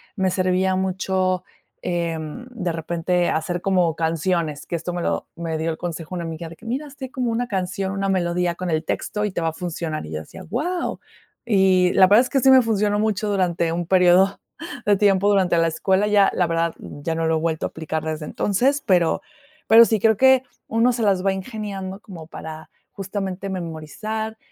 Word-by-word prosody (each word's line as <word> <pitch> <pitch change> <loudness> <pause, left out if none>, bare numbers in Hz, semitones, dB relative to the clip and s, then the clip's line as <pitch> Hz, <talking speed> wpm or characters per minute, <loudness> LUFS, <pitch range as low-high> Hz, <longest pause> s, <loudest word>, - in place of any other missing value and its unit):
me 190 -3 +1
servía 185 0 +1
mucho, 185 -1 0 0.4
em, 170 +3 -3
de 200 -9 -3
repente, 170 +2 -1
hacer 175 +2 -1
como 180 -4 +2
canciones, 160 -2 -1
que - - -3
esto 170 +2 -5
me 175 - -3
lo - - -2
me 165 -1 -3
dio 160 +1 -1
el 160 - -5
consejo 170 0 -5
una 175 - -3
amiga 165 0 -6
de 165 - -11
que: 225 - -18
"Mira, 265 +6 -3
hazte 270 -2 -9
como 250 -2 -1
una 240 +2 -1
canción, 190 -1 -2
una 195 0 -2
melodía 175 -2 0
con 180 0 -4
el 160 0 -1
texto, 210 +5 -2
y 210 - -2
te - - -2
va 165 - +1
a - - -7
funcionar". 165 -2 -4
Y 75 - -9
yo 75 - -2
decía: 80 - -11
"Guau". 340 - -2 0.5
Y 190 -4 +4
la 185 - +6
verdad 205 +5 +6
es 250 - -2
que 275 - +2
sí 265 +1 +5
me 260 -1 +8
funcionó 210 -3 +1
mucho 215 -1 0
durante 175 -4 +1
un 175 +1 -2
período 185 +1 +4 0.5
de 205 - +4
tiempo 200 -1 +3
durante 190 -4 +3
la 165 - +3
escuela, 190 +5 +1
ya, 205 -2 +5
la 180 - +2
verdad, 165 0 0
ya 155 +3 -5
no 165 0 -1
lo 160 0 +2
he - - -1
vuelto 160 -1 -1
a - - -2
aplicar 160 -1 -4
desde 155 -1 -4
entonces, 255 - 0
pero, 175 -4 +2 0.5
pero 230 +1 +9
sí, 220 -2 +1
creo 220 0 +3
que 265 +1 +5 0.2
uno 230 +2 +2
se 240 - -3
las 195 -3 +2
va 195 - +3
ingeniando 195 -2 -5
como 170 -8 -10
para, 160 -1 -9 0.2
justamente, 195 -1 -4
memorizar, 190 +6 -5
185 Hz, 205 wpm, -22 LUFS, 165-205 Hz, 0.5 s, pero